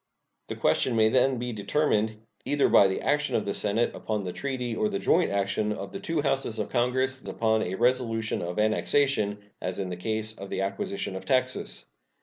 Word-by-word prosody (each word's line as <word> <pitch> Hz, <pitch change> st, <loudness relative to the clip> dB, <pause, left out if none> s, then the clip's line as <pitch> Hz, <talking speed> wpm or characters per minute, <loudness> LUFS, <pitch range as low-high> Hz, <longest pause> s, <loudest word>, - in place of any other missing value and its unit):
The -, -, -4 dB
question 125 Hz, -, +1 dB
may 110 Hz, -1 st, +5 dB
then 130 Hz, +2 st, +3 dB
be 120 Hz, 0 st, -3 dB
determined, 110 Hz, -1 st, 0 dB, 0.2 s
either 145 Hz, -1 st, +2 dB
by 100 Hz, -, +7 dB
the 95 Hz, -, -2 dB
action 145 Hz, -4 st, +1 dB
of 110 Hz, -, 0 dB
the 100 Hz, -, -1 dB
Senate 105 Hz, +3 st, 0 dB
upon 105 Hz, -2 st, -3 dB
the 90 Hz, -1 st, -4 dB
treaty 130 Hz, -4 st, -3 dB
or 215 Hz, -, +1 dB
the 200 Hz, -, -2 dB
joint 180 Hz, -3 st, +2 dB
action 100 Hz, +2 st, 0 dB
of -, -, -5 dB
the 195 Hz, -, -6 dB
two 165 Hz, -6 st, -1 dB
Houses 135 Hz, -6 st, 0 dB
of 105 Hz, -, -2 dB
Congress 130 Hz, +1 st, +1 dB
upon 110 Hz, -1 st, +1 dB
a 95 Hz, -2 st, -2 dB
resolution 115 Hz, -2 st, +1 dB
of 90 Hz, +1 st, -4 dB
annexation, 110 Hz, 0 st, +2 dB, 0.2 s
as 90 Hz, 0 st, -2 dB
in 95 Hz, -2 st, -3 dB
the 90 Hz, -, -3 dB
case 110 Hz, +3 st, -2 dB
of 100 Hz, 0 st, -9 dB
the 95 Hz, -, -2 dB
acquisition 195 Hz, -, -3 dB
of 95 Hz, 0 st, -6 dB
Texas. 130 Hz, +3 st, 0 dB
115 Hz, 195 wpm, -27 LUFS, 105-130 Hz, 0.2 s, by